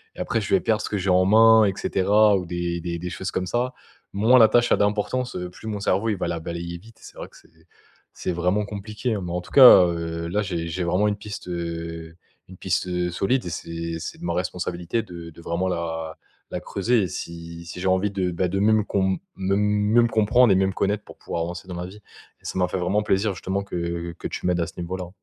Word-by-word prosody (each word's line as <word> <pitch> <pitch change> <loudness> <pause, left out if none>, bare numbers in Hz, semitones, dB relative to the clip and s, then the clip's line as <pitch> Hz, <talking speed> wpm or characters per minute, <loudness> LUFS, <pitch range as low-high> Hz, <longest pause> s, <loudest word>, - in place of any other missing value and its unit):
et - - -13
après - - -1
je - - -3
vais 195 - +6
perdre 110 -1 +1
ce - - -4
que 105 - -1
j'ai 95 0 -2
en 90 0 +4
main 110 +2 +7
et 95 - +1
cetera, 105 +3 +3
ou 90 - -4
des 85 0 -3
des 85 0 -3
des 90 +1 -5
choses 95 - -4
comme 90 - -2
ça. 125 +4 -1 0.4
Moins 115 +6 +5
la 110 - +8
tâche 120 +2 +2
a - - +5
d'importance, 105 +5 0
heu, 90 0 -5
plus 110 - -11
mon 105 -1 -3
cerveau, 100 +3 +1
il 105 - 0
va - - -2
la 85 - -2
balayer 85 +1 -5
vite 110 +4 -18
et - - -20
c'est - - -13
vrai - - -7
que - - -18
c'est 80 0 -24 0.5
c'est 90 - -3
vraiment 90 +5 0
compliqué, 105 +4 -4
hein. 100 - -3
Mais 85 - -5
en 90 - -1
tout - - -15
cas, 125 -9 +9
heu, 85 -1 -3
là 105 +4 0
j'ai 85 -4 -3
j'ai 90 +2 -3
vraiment 90 +5 +2
une 105 - 0
piste, 100 -2 -8
heu, 85 -1 -5 0.3
une 95 - -12
piste, 95 0 -1
heu, 90 -1 -1
solide 110 +6 0
et - - -3
c'est 85 0 -5
c'est 80 - -7
de - - -8
ma 85 - -1
responsabilité 90 +3 -2
de 85 -5 -9
de 85 - -14
vraiment 85 +3 -2
la 80 -2 -4 0.3
la - - -3
creuser 110 +3 0
et 95 - -1
si 85 0 -7
si 85 +1 -8
j'ai 95 - -5
envie 95 +2 +2
de, 95 -2 -1
bah, 90 +1 0
de 95 +3 -2
même 110 +1 +3
qu'on 100 -1 0
me 95 0 0 0.4
même - - +1
même 105 +3 +3
comprendre 110 +2 +4
et 95 - +5
même 95 0 +2
connaître 105 +1 -1
pour - - -14
pouvoir 85 - -3
avancer 85 +1 -6
dans 90 - -6
ma 90 +1 -4
vie 95 +3 -10
et 105 - -22
ça - - -4
m'a 90 -1 +2
fait 95 - -3
vraiment 95 +4 +1
plaisir 100 -1 +1
justement 95 +4 -2
que 85 -3 -4
que - - -5
tu - - -4
m'aides 90 -1 +1
à 85 - +1
ce - - -10
niveau-là. 90 +1 -5
95 Hz, 255 wpm, -24 LUFS, 85-105 Hz, 0.5 s, cas